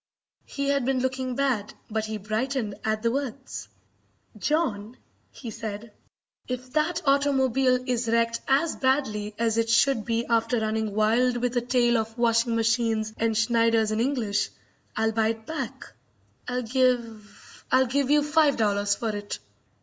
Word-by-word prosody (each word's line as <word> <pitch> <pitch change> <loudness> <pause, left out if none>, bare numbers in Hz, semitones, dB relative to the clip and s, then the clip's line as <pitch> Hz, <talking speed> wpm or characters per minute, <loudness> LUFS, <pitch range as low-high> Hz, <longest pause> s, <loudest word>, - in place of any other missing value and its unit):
He 280 0 -2
had 280 -2 +2
been 260 +1 +1
looking 260 0 -2
bad, 250 -7 -1
but 220 0 -2
he 215 0 -4
brightened 220 +2 -2
at 215 0 -1
the 230 - +2
words. 270 0 -4 0.7
"John," 250 -8 -1 0.3
he 235 -4 -8
said, 220 0 -6 0.6
"if 255 0 -5
that 330 +3 0
automobile 270 -2 +3
is 245 -2 -1
wrecked 230 0 +1
as 285 +5 +2
badly 215 -6 0
as 230 -1 +1
it 230 0 0
should 230 0 +3
be 230 +1 -1
after 230 0 +1
running 220 -1 -2
wild 235 +4 +2
with 245 +1 -1
a 245 - +2
tail 240 -1 +2
of 225 +1 -5
washing 230 0 +2
machines 225 -1 +1
and 225 -1 +1
Schneiders 230 0 +2
in 215 - -1
English, 235 -5 0 0.5
I'll 220 0 +2
buy 220 0 +1
it 225 0 -3
back. 270 -3 -6 0.5
I'll 250 0 -2
give 235 -4 -2
I'll 260 0 +5
give 270 +2 0
you 295 0 +4
five 300 -1 +3
dollars 205 -2 +1
for 220 -1 -3
it." 205 0 -5
235 Hz, 155 wpm, -26 LUFS, 220-260 Hz, 0.7 s, I'll